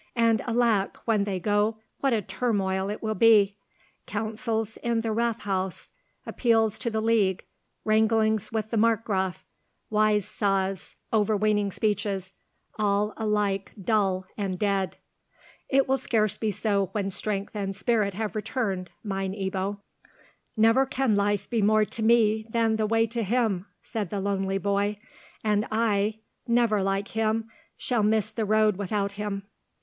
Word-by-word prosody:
"And 230 Hz, -2 st, +3 dB
alack! 230 Hz, -4 st, +1 dB
when 215 Hz, -3 st, +2 dB
they 195 Hz, -2 st, -2 dB
go, 210 Hz, +3 st, +1 dB, 0.2 s
what 275 Hz, -, +1 dB
a 220 Hz, -3 st, +1 dB
turmoil 195 Hz, -2 st, -1 dB
it 210 Hz, -, -5 dB
will 215 Hz, 0 st, 0 dB
be! 210 Hz, -2 st, +5 dB, 0.5 s
Councils 220 Hz, +1 st, -2 dB
in 235 Hz, -1 st, 0 dB
the 225 Hz, -1 st, -2 dB
Rathhaus, 205 Hz, -5 st, -2 dB, 0.3 s
appeals 225 Hz, -3 st, +1 dB
to 245 Hz, -, -1 dB
the 220 Hz, -1 st, -1 dB
League, 215 Hz, -5 st, +2 dB, 0.4 s
wranglings 220 Hz, -1 st, +2 dB
with 220 Hz, -1 st, -2 dB
the 230 Hz, -, 0 dB
Markgraf, 205 Hz, -5 st, +1 dB, 0.5 s
wise 210 Hz, -1 st, +3 dB
saws, 195 Hz, -2 st, -1 dB, 0.2 s
overweening 210 Hz, -1 st, +2 dB
speeches, 200 Hz, -3 st, -2 dB, 0.5 s
all 210 Hz, 0 st, +1 dB
alike 210 Hz, -3 st, -1 dB
dull 195 Hz, -2 st, +1 dB
and 195 Hz, -3 st, -2 dB
dead." 195 Hz, -1 st, 0 dB, 0.7 s
"It 275 Hz, 0 st, +3 dB
will 265 Hz, 0 st, +2 dB
scarce 215 Hz, -5 st, +1 dB
be 220 Hz, -, -1 dB
so 200 Hz, -1 st, 0 dB
when 195 Hz, -2 st, -1 dB
strength 205 Hz, +1 st, -3 dB
and 195 Hz, -2 st, -3 dB
spirit 210 Hz, -5 st, 0 dB
have 215 Hz, +1 st, -3 dB
returned, 205 Hz, -4 st, -2 dB
mine 195 Hz, -2 st, -2 dB
Ebbo." 195 Hz, 0 st, -3 dB, 0.8 s
"Never 225 Hz, +5 st, +4 dB
can 260 Hz, -4 st, +1 dB
life 205 Hz, 0 st, +1 dB
be 230 Hz, -3 st, 0 dB
more 215 Hz, +1 st, +4 dB
to 225 Hz, -, -6 dB
me 220 Hz, -1 st, +3 dB
than 225 Hz, -1 st, +1 dB
the 215 Hz, -1 st, +1 dB
way 225 Hz, +1 st, +3 dB
to 230 Hz, +1 st, -3 dB
him," 215 Hz, -3 st, 0 dB, 0.2 s
said 210 Hz, -5 st, -4 dB
the 200 Hz, -, -3 dB
lonely 195 Hz, -1 st, -1 dB
boy; 200 Hz, +1 st, 0 dB, 0.5 s
"and 210 Hz, -1 st, +1 dB
I—never 220 Hz, +1 st, 0 dB
like 195 Hz, +1 st, -1 dB
him—shall 225 Hz, +1 st, -2 dB
miss 215 Hz, 0 st, +2 dB
the 225 Hz, -, -2 dB
road 215 Hz, -1 st, +3 dB
without 200 Hz, 0 st, -1 dB
him." 200 Hz, -1 st, -4 dB
210 Hz, 140 wpm, -26 LUFS, 200-225 Hz, 0.8 s, be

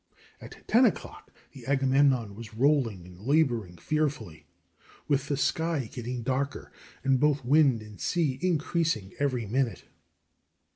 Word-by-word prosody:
At -, -, -13 dB
ten 245 Hz, +3 st, +5 dB
o'clock 220 Hz, -, -3 dB, 0.2 s
the -, -, -13 dB
Agamemnon 135 Hz, -5 st, +2 dB
was 110 Hz, +1 st, -10 dB
rolling 120 Hz, -, +1 dB
and 90 Hz, 0 st, -14 dB
laboring 120 Hz, -, +1 dB
fearfully, 130 Hz, -, -3 dB, 0.6 s
with 140 Hz, -1 st, +1 dB
the 145 Hz, -, -1 dB
sky 155 Hz, -3 st, -1 dB
getting 120 Hz, -1 st, -5 dB
darker, 135 Hz, +3 st, -2 dB, 0.3 s
and 135 Hz, -1 st, +2 dB
both 145 Hz, -2 st, +1 dB
wind 135 Hz, -4 st, +4 dB
and 105 Hz, -1 st, -13 dB
sea 150 Hz, -7 st, 0 dB
increasing 165 Hz, -, 0 dB
every 130 Hz, -5 st, 0 dB
minute. 120 Hz, +2 st, -1 dB
135 Hz, 130 wpm, -28 LUFS, 115-150 Hz, 0.6 s, ten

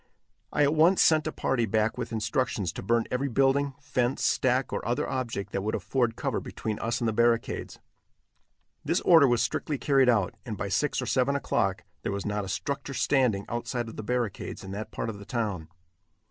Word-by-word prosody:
I 145 Hz, -, +2 dB
at 145 Hz, +1 st, +3 dB
once 165 Hz, +4 st, +4 dB
sent 155 Hz, -1 st, +4 dB
a -, -, -1 dB
party 120 Hz, -6 st, 0 dB
back 110 Hz, +1 st, +1 dB
with 125 Hz, -1 st, -5 dB
instructions 110 Hz, -4 st, -1 dB
to -, -, -6 dB
burn 115 Hz, +4 st, +1 dB
every 130 Hz, +3 st, 0 dB
building, 135 Hz, +2 st, +2 dB
fence, 130 Hz, -3 st, -1 dB
stack 130 Hz, 0 st, +1 dB
or -, -, -2 dB
other 120 Hz, +3 st, -1 dB
object 120 Hz, -7 st, -3 dB
that 100 Hz, -, -2 dB
would 110 Hz, +2 st, -1 dB
afford 120 Hz, -4 st, 0 dB
cover -, -, -1 dB
between 110 Hz, -1 st, -5 dB
us 115 Hz, +2 st, -2 dB
and 115 Hz, -, +1 dB
the 110 Hz, -, 0 dB
barricades. 115 Hz, +1 st, +1 dB, 1.1 s
This -, -, +1 dB
order 165 Hz, -5 st, +7 dB
was 120 Hz, -2 st, +2 dB
strictly 145 Hz, +3 st, -2 dB
carried 135 Hz, -2 st, +3 dB
out, 105 Hz, -6 st, +2 dB
and 110 Hz, -4 st, -5 dB
by 100 Hz, -, -3 dB
six 145 Hz, +8 st, 0 dB
or -, -, -3 dB
seven 135 Hz, +2 st, +1 dB
o'clock 95 Hz, -8 st, 0 dB, 0.2 s
there -, -, -2 dB
was 100 Hz, 0 st, -3 dB
not 105 Hz, 0 st, -1 dB
a 95 Hz, -, -6 dB
structure 140 Hz, +5 st, -3 dB
standing 125 Hz, -10 st, +2 dB
outside 120 Hz, 0 st, -3 dB
of -, -, -10 dB
the -, -, -5 dB
barricades 115 Hz, -4 st, -3 dB
in 95 Hz, -, -7 dB
that 105 Hz, +2 st, -5 dB
part 115 Hz, -, -3 dB
of 100 Hz, -, -10 dB
the -, -, -9 dB
town. 105 Hz, -10 st, -2 dB
120 Hz, 200 wpm, -28 LUFS, 110-135 Hz, 1.1 s, order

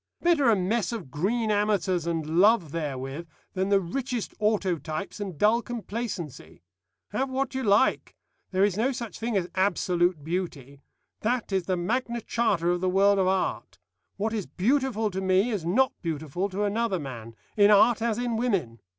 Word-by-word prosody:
Better 330 Hz, -7 st, +3 dB
a 225 Hz, -, +5 dB
mess 200 Hz, +2 st, 0 dB
of 195 Hz, -, -6 dB
green 215 Hz, -, 0 dB
amateurs 205 Hz, -5 st, +1 dB
and 165 Hz, 0 st, -1 dB
love 200 Hz, -6 st, +4 dB
therewith, 145 Hz, 0 st, -4 dB, 0.3 s
than 190 Hz, +1 st, -1 dB
the 200 Hz, -1 st, +4 dB
richest 245 Hz, +5 st, -3 dB
autotypes 195 Hz, -5 st, -1 dB
and 195 Hz, -6 st, -5 dB
dull 220 Hz, +7 st, +3 dB
complacency. 200 Hz, -, -6 dB, 0.5 s
Have 270 Hz, +1 st, -1 dB
what 265 Hz, 0 st, -2 dB
you 265 Hz, -, -2 dB
like. 210 Hz, +1 st, +2 dB, 0.3 s
There 190 Hz, 0 st, +1 dB
is 200 Hz, -3 st, +2 dB
no 235 Hz, +6 st, +1 dB
such 235 Hz, -3 st, -6 dB
thing 225 Hz, -2 st, -1 dB
as 180 Hz, -2 st, -1 dB
absolute 180 Hz, -4 st, +1 dB
beauty. 145 Hz, -5 st, -4 dB, 0.4 s
That 235 Hz, -1 st, -1 dB
is 190 Hz, -2 st, 0 dB
the 185 Hz, -1 st, +1 dB
Magna 235 Hz, +6 st, -1 dB
Charta 200 Hz, -8 st, 0 dB
of 175 Hz, 0 st, 0 dB
the 185 Hz, -, +1 dB
world 200 Hz, +2 st, +4 dB
of 185 Hz, -, +2 dB
art. 190 Hz, 0 st, -1 dB, 0.4 s
What 220 Hz, +2 st, -1 dB
is 210 Hz, -5 st, -3 dB
beautiful 225 Hz, -, 0 dB
to 190 Hz, +1 st, -3 dB
me 190 Hz, +5 st, +2 dB
is 190 Hz, -7 st, -3 dB
not 255 Hz, +9 st, +3 dB
beautiful 165 Hz, +3 st, -3 dB
to 200 Hz, +2 st, -2 dB
another 210 Hz, -1 st, 0 dB
man, 120 Hz, -7 st, -8 dB, 0.2 s
in 205 Hz, -1 st, +6 dB
art 215 Hz, +3 st, +5 dB
as 225 Hz, -2 st, 0 dB
in 240 Hz, -2 st, -1 dB
women. 195 Hz, -, -1 dB
200 Hz, 170 wpm, -27 LUFS, 175-230 Hz, 0.5 s, in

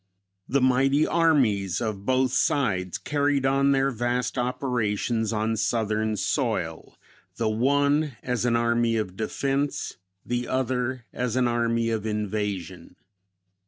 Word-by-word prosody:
The 140 Hz, +1 st, +2 dB
mighty 135 Hz, +3 st, +3 dB
armies 125 Hz, -, +2 dB
of 105 Hz, -4 st, -4 dB
both 130 Hz, 0 st, +2 dB
sides 95 Hz, -10 st, +1 dB
carried 145 Hz, -2 st, 0 dB
on 135 Hz, +1 st, +3 dB
their 135 Hz, 0 st, +2 dB
vast 120 Hz, +1 st, -1 dB
operations 120 Hz, -3 st, -1 dB
on 110 Hz, 0 st, 0 dB
southern 110 Hz, -1 st, 0 dB
soil; 95 Hz, -, -2 dB, 0.4 s
the 115 Hz, -, -1 dB
one 140 Hz, +4 st, +1 dB
as 125 Hz, -3 st, -1 dB
an 120 Hz, -1 st, +2 dB
army 115 Hz, 0 st, +2 dB
of 100 Hz, -4 st, -3 dB
defense, 135 Hz, +6 st, -2 dB, 0.3 s
the 120 Hz, 0 st, -2 dB
other 130 Hz, -1 st, -1 dB
as 125 Hz, -1 st, -2 dB
an 130 Hz, -1 st, +2 dB
army 115 Hz, -1 st, 0 dB
of 110 Hz, -1 st, -2 dB
invasion. 105 Hz, -3 st, -3 dB
120 Hz, 125 wpm, -25 LUFS, 110-135 Hz, 0.4 s, mighty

